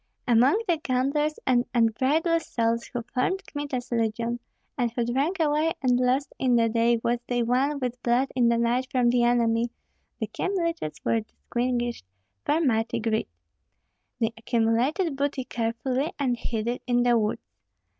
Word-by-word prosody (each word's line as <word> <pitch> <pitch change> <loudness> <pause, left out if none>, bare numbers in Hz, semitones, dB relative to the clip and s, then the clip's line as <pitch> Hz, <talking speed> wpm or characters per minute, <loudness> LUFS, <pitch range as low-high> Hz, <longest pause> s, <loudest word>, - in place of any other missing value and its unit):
Among 250 - +4
the 345 -2 +2
gamblers 295 +2 0
and 245 -2 +3
unbridled 275 +9 +2
souls 230 -4 -1
who 240 -1 -5
formed 375 +12 -1
Kmita's 275 -4 -5
legion, 230 +1 -1 0.4
and 240 -3 0
who 235 0 -1
drank 280 +10 0
away 310 +1 +2
and 250 -1 +3
lost 255 +3 +1
in 255 -2 +3
the 230 -1 +4
day 230 +1 +3
what 240 0 0
they 245 -1 +1
won 260 +5 +1
with 250 -2 -4
blood 250 +3 +2
in 240 -2 +4
the 235 - +2
night 240 +2 +1
from 245 -3 +2
the 245 0 +3
enemy, 235 -1 +2 0.5
the - - -1
Kyemliches 335 - -3
were 230 - +2
distinguished 240 - -3 0.4
for 310 - +2
mighty 230 -7 +1
greed. 220 -1 0 0.9
They 225 -1 0
accumulated 235 - +1
booty 280 -1 -1
carefully, 250 +5 -2
and 260 -4 +1
hid 225 -1 -3
it 240 +1 -2
in 245 -1 +3
the 240 -1 +4
woods. 210 0 -2
245 Hz, 155 wpm, -26 LUFS, 235-275 Hz, 0.9 s, Among